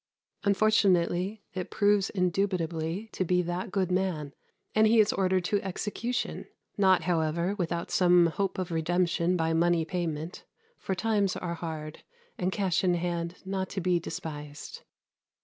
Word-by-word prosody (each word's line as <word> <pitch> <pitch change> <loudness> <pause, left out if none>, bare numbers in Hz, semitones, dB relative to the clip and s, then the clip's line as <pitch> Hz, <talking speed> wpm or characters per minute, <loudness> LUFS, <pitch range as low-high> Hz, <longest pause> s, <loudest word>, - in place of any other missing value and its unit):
" - - -45
Unfortunately 200 -1 +2
it 185 -2 -4
proves 205 -1 +2
indubitably 180 -1 -1
to - - -1
be 180 0 +2
that 175 +4 -3
good 185 -2 0
man; 180 -6 -1 0.4
and 215 0 +5
he 225 +1 +5
is 215 -1 +4
ordered 185 -1 +1
to 205 +2 +1
execution, 210 +6 -3 0.3
not, 190 -4 +4
however, 170 +1 0
without 170 -1 -2
some 175 -1 +5
hope 190 +3 -1
of 185 -1 -3
redemption 170 +1 +1
by 165 -1 +1
money 170 0 +2
payment; 165 -1 -4 0.4
for 190 - -2
times 205 -1 +1
are 170 -2 -3
hard, 160 -2 -6 0.3
and 185 +1 -1
cash 190 -3 0
in 180 -1 +3
hand 170 0 -2
not 190 -1 -2
to - - -3
be 180 -1 +2
despised. 150 -3 -7
180 Hz, 150 wpm, -28 LUFS, 170-195 Hz, 0.4 s, and